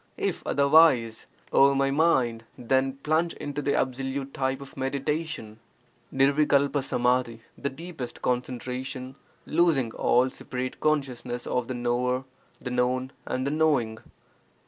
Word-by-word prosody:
If -, -, -2 dB
otherwise, 140 Hz, -6 st, +4 dB, 0.3 s
O 140 Hz, 0 st, +6 dB
my 135 Hz, 0 st, +2 dB
mind, 130 Hz, -7 st, +2 dB
then 130 Hz, +2 st, +1 dB
plunge 160 Hz, +2 st, +1 dB
into 145 Hz, 0 st, -4 dB
the 140 Hz, 0 st, 0 dB
absolute 135 Hz, +1 st, -2 dB
type 130 Hz, 0 st, -1 dB
of 135 Hz, -1 st, -11 dB
meditation. 140 Hz, -3 st, -3 dB, 0.5 s
[PlfqcbcH 140 Hz, +3 st, +3 dB
■HHlfsT 125 Hz, -4 st, +1 dB
— -, -, -35 dB
the 140 Hz, -, -1 dB
deepest 145 Hz, -3 st, -8 dB
concentration 130 Hz, +1 st, -3 dB, 0.3 s
losing 155 Hz, -8 st, +2 dB
all 125 Hz, +2 st, +3 dB
sepa -, -, -11 dB
rate 130 Hz, +1 st, -3 dB
consciousness 130 Hz, -5 st, -1 dB
of 125 Hz, -1 st, -1 dB
the 130 Hz, -, -4 dB
knower, 125 Hz, +1 st, 0 dB, 0.4 s
the 125 Hz, -, -5 dB
known, 125 Hz, +1 st, 0 dB, 0.2 s
and 130 Hz, +1 st, -2 dB
the 140 Hz, -, 0 dB
knowing. 140 Hz, -8 st, +1 dB
130 Hz, 130 wpm, -26 LUFS, 125-140 Hz, 0.5 s, O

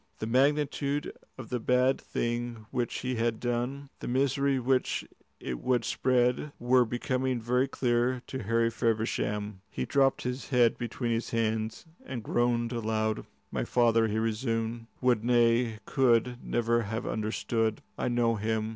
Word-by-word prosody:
The -, -, -4 dB
magnitude 140 Hz, +3 st, +1 dB, 0.2 s
of 130 Hz, -4 st, -8 dB
the 125 Hz, -, -1 dB
bad 125 Hz, +3 st, +2 dB
thing 120 Hz, -1 st, -3 dB
which 125 Hz, -2 st, -2 dB
he 130 Hz, -1 st, -2 dB
had 115 Hz, -1 st, 0 dB
done, 125 Hz, +3 st, -2 dB
the -, -, -6 dB
misery 135 Hz, +2 st, +2 dB
which 130 Hz, +1 st, 0 dB, 0.3 s
it 60 Hz, -2 st, -4 dB
would 125 Hz, -3 st, +1 dB
spread, 125 Hz, +3 st, +1 dB
were 125 Hz, +1 st, +4 dB
becoming 125 Hz, +2 st, -1 dB
very 125 Hz, +3 st, +1 dB
clear 125 Hz, -1 st, 0 dB
to 130 Hz, -, -5 dB
Harry 115 Hz, +2 st, +1 dB
Feversham. 105 Hz, -3 st, -1 dB
He 65 Hz, -, -3 dB
dropped 135 Hz, -, +2 dB
his 125 Hz, +1 st, -4 dB
head 120 Hz, -4 st, +4 dB
between 120 Hz, 0 st, -2 dB
his 115 Hz, 0 st, -1 dB
hands 110 Hz, -1 st, -1 dB, 0.2 s
and 125 Hz, -4 st, -6 dB
groaned 120 Hz, 0 st, +1 dB
aloud. 110 Hz, -2 st, -1 dB, 0.2 s
"My -, -, -1 dB
father," 115 Hz, -2 st, +3 dB
he 110 Hz, 0 st, -1 dB
resumed, 115 Hz, 0 st, -1 dB
"would, 125 Hz, -4 st, +2 dB
nay, 120 Hz, -1 st, +3 dB
could, 125 Hz, -2 st, +2 dB
never 120 Hz, 0 st, +1 dB
have 110 Hz, +2 st, -4 dB
understood. 110 Hz, 0 st, -1 dB
I -, -, -2 dB
know 120 Hz, -2 st, +2 dB
him. 110 Hz, +1 st, -1 dB
120 Hz, 145 wpm, -29 LUFS, 115-125 Hz, 0.3 s, were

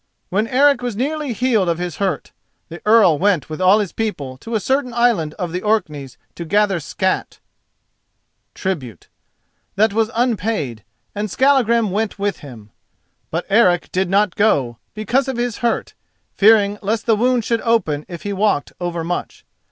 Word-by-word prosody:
When 210 Hz, +4 st, 0 dB
Eric 275 Hz, +1 st, +3 dB
was 245 Hz, -3 st, -3 dB
nearly 290 Hz, +4 st, -2 dB
healed 225 Hz, -6 st, +1 dB
of 165 Hz, -, 0 dB
his 175 Hz, -2 st, -5 dB
hurt, 195 Hz, -2 st, -2 dB, 0.4 s
the 170 Hz, +1 st, -9 dB
Earl 205 Hz, -9 st, +5 dB
went 185 Hz, -7 st, +1 dB
with 155 Hz, -, -5 dB
all 185 Hz, +3 st, +6 dB
his 205 Hz, -5 st, -2 dB
people 150 Hz, -13 st, -4 dB
to 225 Hz, -, -6 dB
a -, -, +2 dB
certain 260 Hz, +1 st, -1 dB
island 230 Hz, -11 st, +1 dB
of 175 Hz, -2 st, -4 dB
the 180 Hz, +2 st, -3 dB
Orkneys 155 Hz, -, -2 dB, 0.2 s
to 170 Hz, -, -7 dB
gather 200 Hz, +1 st, +1 dB
scat[*] 185 Hz, +5 st, -2 dB, 1.2 s
that 190 Hz, -, -4 dB
was 220 Hz, 0 st, +1 dB
unpaid, 210 Hz, -, -1 dB, 0.3 s
and 210 Hz, +1 st, -3 dB
Skallagrim 235 Hz, -3 st, +2 dB
went 210 Hz, +2 st, -2 dB
with 200 Hz, -2 st, -2 dB
him. 115 Hz, -7 st, -12 dB, 0.6 s
But 165 Hz, +2 st, -3 dB
Eric 195 Hz, -5 st, +3 dB
did 185 Hz, 0 st, 0 dB
not 200 Hz, 0 st, +2 dB
go, 135 Hz, -, +1 dB, 0.2 s
because 240 Hz, +6 st, 0 dB
of 265 Hz, -2 st, -3 dB
his 240 Hz, -2 st, -2 dB
hurt, 235 Hz, -1 st, -1 dB, 0.4 s
fearing 205 Hz, -1 st, +4 dB
lest 220 Hz, +3 st, -2 dB
the 225 Hz, -, +3 dB
wound 245 Hz, +1 st, +1 dB
should 230 Hz, -1 st, 0 dB
open 180 Hz, -11 st, 0 dB
if 170 Hz, -3 st, -8 dB
he 205 Hz, -, -3 dB
walked 200 Hz, -7 st, 0 dB
overmuch. 175 Hz, 0 st, -4 dB
205 Hz, 160 wpm, -19 LUFS, 175-230 Hz, 1.2 s, all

